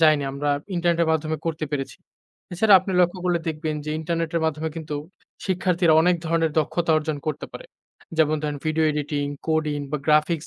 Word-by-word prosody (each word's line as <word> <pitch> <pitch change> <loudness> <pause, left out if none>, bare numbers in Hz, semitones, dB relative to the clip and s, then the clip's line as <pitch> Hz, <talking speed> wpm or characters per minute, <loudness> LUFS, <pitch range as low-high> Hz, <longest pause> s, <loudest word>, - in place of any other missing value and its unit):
যাইনি। 155 -2 +5
আমরা 145 +2 -2 0.3
ইন্টারনেটের 170 -1 +2
মাধ্যমে 155 0 -1
করতে 160 -1 -2
পেরেছি। 140 -2 -3 0.6
এছাড়া 200 +3 +5
আপনি 190 +1 -4
লক্ষ্য 180 +1 +2
করলে 175 -1 +2
দেখবেন 155 0 -2
যে 155 - -4
ইন্টারনেটের 165 0 -1
মাধ্যমে 160 0 -1
কিন্তু 155 -2 -5 0.5
শিক্ষার্থীরা 180 -2 +2
অনেক 180 0 +3
ধরনের 165 0 +1
দক্ষতা 165 +2 0
অর্জন 155 -1 -3
করতে 150 -1 -3
পারে। - - -8 0.5
যেমন 155 0 +4
ধরেন 150 -1 -2
ভিডিও 155 0 +2
এডিটিং, 145 -1 -2 0.2
কোডিং 155 -2 0
বা 150 - 0
গ্রাফিক্স 155 +1 +2
160 Hz, 165 wpm, -24 LUFS, 150-170 Hz, 0.6 s, যাইনি